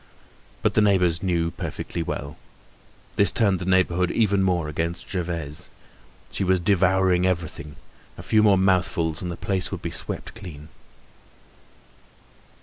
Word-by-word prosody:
But -, -, +2 dB
the -, -, +3 dB
neighbors 90 Hz, -5 st, +2 dB
knew 85 Hz, -3 st, 0 dB
perfectly 85 Hz, -, -5 dB
well. 70 Hz, -3 st, -5 dB, 0.8 s
This 100 Hz, -3 st, +6 dB
turned 100 Hz, -6 st, +2 dB
the 90 Hz, -, -5 dB
neighborhood 90 Hz, -1 st, +2 dB
even 100 Hz, -2 st, +2 dB
more 90 Hz, -4 st, +1 dB
against 80 Hz, +3 st, -3 dB
Gervaise. 85 Hz, -5 st, -4 dB, 0.6 s
She -, -, -2 dB
was 95 Hz, 0 st, +2 dB
devouring 95 Hz, 0 st, +2 dB
everything; 80 Hz, -4 st, -3 dB, 0.4 s
a -, -, -9 dB
few 110 Hz, -, +3 dB
more 105 Hz, -2 st, +5 dB
mouthfuls 90 Hz, -4 st, +1 dB
and 90 Hz, -, -4 dB
the 85 Hz, -, -5 dB
place 95 Hz, -2 st, -1 dB
would -, -, -6 dB
be -, -, -3 dB
swept -, -, -6 dB
clean. 80 Hz, -9 st, -10 dB
90 Hz, 140 wpm, -24 LUFS, 85-95 Hz, 0.8 s, This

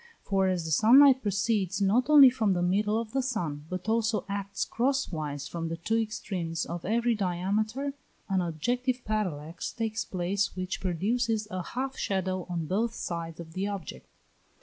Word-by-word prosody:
For 195 Hz, -1 st, +1 dB
as 180 Hz, -3 st, 0 dB
the 160 Hz, -, -4 dB
sun 220 Hz, -, +6 dB
light 275 Hz, -2 st, +7 dB
proceeds 200 Hz, -2 st, 0 dB
not 215 Hz, +7 st, +2 dB
only 285 Hz, -4 st, +9 dB
from 220 Hz, -6 st, +1 dB
the 175 Hz, -1 st, 0 dB
middle 210 Hz, +4 st, +2 dB
of 230 Hz, -2 st, -5 dB
the 270 Hz, -, +1 dB
sun, 170 Hz, -, -3 dB
but 185 Hz, +2 st, -5 dB
also 225 Hz, -1 st, +1 dB
acts 200 Hz, 0 st, -3 dB
cross 270 Hz, +1 st, 0 dB
wise 150 Hz, -4 st, -4 dB
from 165 Hz, -1 st, -4 dB
the 165 Hz, -, -4 dB
two 225 Hz, +7 st, 0 dB
extremes 180 Hz, -6 st, -3 dB
of 170 Hz, 0 st, -5 dB
every 235 Hz, +3 st, +2 dB
diameter, 215 Hz, +8 st, -1 dB, 0.3 s
an 190 Hz, -2 st, +1 dB
objective 245 Hz, -, -1 dB
parallax 175 Hz, -7 st, -3 dB
takes 220 Hz, -1 st, -2 dB
place 190 Hz, 0 st, -1 dB
which 185 Hz, 0 st, -4 dB
produces 215 Hz, +5 st, 0 dB
a 185 Hz, -, -2 dB
half 260 Hz, +8 st, -4 dB
shadow 185 Hz, -2 st, -2 dB
on 170 Hz, -2 st, -2 dB
both 220 Hz, +7 st, -1 dB
sides 170 Hz, -1 st, -5 dB
of 160 Hz, -1 st, -9 dB
the 190 Hz, +3 st, -2 dB
object. 185 Hz, -, -6 dB
200 Hz, 170 wpm, -28 LUFS, 175-230 Hz, 0.3 s, only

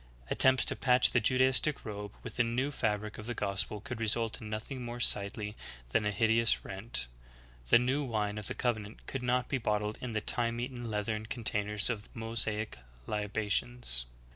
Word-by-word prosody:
Attempts 130 Hz, 0 st, +6 dB
to -, -, -1 dB
patch 125 Hz, -1 st, +4 dB
the 120 Hz, -, +3 dB
Judaistic 130 Hz, +5 st, +2 dB
robe 105 Hz, -2 st, -6 dB
with 115 Hz, -, -7 dB
the 120 Hz, -, +4 dB
new 125 Hz, +5 st, -1 dB
fabric 105 Hz, -5 st, -2 dB
of 110 Hz, -, -7 dB
the 120 Hz, -, -3 dB
gospel 100 Hz, 0 st, -2 dB
could 115 Hz, +3 st, -6 dB
result 115 Hz, 0 st, 0 dB
in 110 Hz, -, -7 dB
nothing 115 Hz, +4 st, -5 dB
more 120 Hz, 0 st, -6 dB
sightly 105 Hz, -1 st, +1 dB, 0.3 s
than 105 Hz, -, +1 dB
a -, -, +1 dB
hideous 115 Hz, +2 st, +3 dB
rent. 100 Hz, -, -3 dB, 0.6 s
The -, -, +8 dB
new 130 Hz, +4 st, 0 dB
vv^ine 105 Hz, -2 st, -1 dB
of 105 Hz, -, -2 dB
the -, -, -2 dB
covenant 110 Hz, -4 st, -3 dB
could 135 Hz, -, -4 dB
not 125 Hz, 0 st, +1 dB
be 135 Hz, -, -1 dB
bottled 105 Hz, -1 st, -1 dB
in 125 Hz, -2 st, -4 dB
the 110 Hz, -, +1 dB
time 115 Hz, +2 st, +3 dB
eaten 120 Hz, -1 st, -5 dB
leathern 110 Hz, +1 st, -2 dB
containers 105 Hz, -3 st, +1 dB
of 110 Hz, -4 st, -3 dB
Mosaic 110 Hz, -, -3 dB, 0.3 s
li 105 Hz, -1 st, -2 dB
bations. 105 Hz, -, -1 dB
110 Hz, 180 wpm, -31 LUFS, 105-120 Hz, 0.6 s, The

